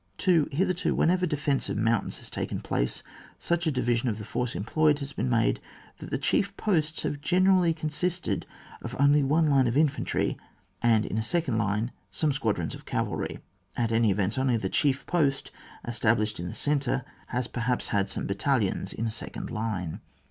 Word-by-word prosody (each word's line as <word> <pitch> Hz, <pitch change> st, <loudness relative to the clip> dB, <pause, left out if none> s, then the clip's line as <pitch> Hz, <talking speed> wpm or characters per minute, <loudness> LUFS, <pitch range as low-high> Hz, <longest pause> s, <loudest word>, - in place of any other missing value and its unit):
2. 170 Hz, -5 st, +3 dB
Hitherto, 180 Hz, +4 st, +1 dB
wherever 180 Hz, +2 st, +3 dB
defence 145 Hz, -3 st, 0 dB
of -, -, -2 dB
mountains 115 Hz, 0 st, +1 dB
has -, -, -11 dB
taken -, -, -3 dB
place, -, -, -2 dB, 0.3 s
such 170 Hz, 0 st, 0 dB
a -, -, +3 dB
divi 125 Hz, -3 st, +1 dB
sion 120 Hz, +1 st, 0 dB
of 105 Hz, -, -2 dB
the 105 Hz, -, -7 dB
force 125 Hz, +3 st, -2 dB
employed 150 Hz, +8 st, +2 dB
has 140 Hz, -1 st, -6 dB
been 130 Hz, -, -1 dB
made 115 Hz, -2 st, +2 dB, 0.4 s
that -, -, -8 dB
the -, -, 0 dB
chief 200 Hz, 0 st, 0 dB
posts 160 Hz, -6 st, 0 dB
have 145 Hz, 0 st, -2 dB
generally 185 Hz, +1 st, +4 dB
consisted 160 Hz, -, -2 dB, 0.3 s
of 120 Hz, +1 st, -6 dB
only 145 Hz, +1 st, +5 dB
one 150 Hz, +4 st, +3 dB
line 135 Hz, -3 st, +4 dB
of 120 Hz, +3 st, +1 dB
infantry, 150 Hz, -2 st, +1 dB, 0.4 s
and 115 Hz, -2 st, +4 dB
in 110 Hz, -, -2 dB
a -, -, +1 dB
second 160 Hz, -2 st, 0 dB
line, 105 Hz, +3 st, 0 dB, 0.2 s
some 155 Hz, -2 st, 0 dB
squadrons 110 Hz, -, -1 dB
of -, -, -9 dB
cavalry; -, -, -2 dB, 0.4 s
at 115 Hz, -2 st, +1 dB
all 115 Hz, +1 st, +3 dB
events, 100 Hz, +2 st, +1 dB
only 130 Hz, -3 st, +2 dB
the 95 Hz, -4 st, -2 dB
chief 135 Hz, +3 st, +1 dB
post 145 Hz, -6 st, 0 dB, 0.4 s
established 110 Hz, -3 st, +1 dB
in 85 Hz, -, -4 dB
the -, -, -5 dB
centre 135 Hz, -3 st, 0 dB, 0.2 s
has 125 Hz, 0 st, -2 dB
perhaps 125 Hz, 0 st, -1 dB
had 100 Hz, -2 st, +1 dB
some -, -, -4 dB
battalions 100 Hz, -2 st, 0 dB
in 115 Hz, -, -3 dB
a 110 Hz, -, -1 dB
second 110 Hz, -, -6 dB
line. 105 Hz, -7 st, -3 dB
130 Hz, 185 wpm, -28 LUFS, 110-155 Hz, 0.4 s, only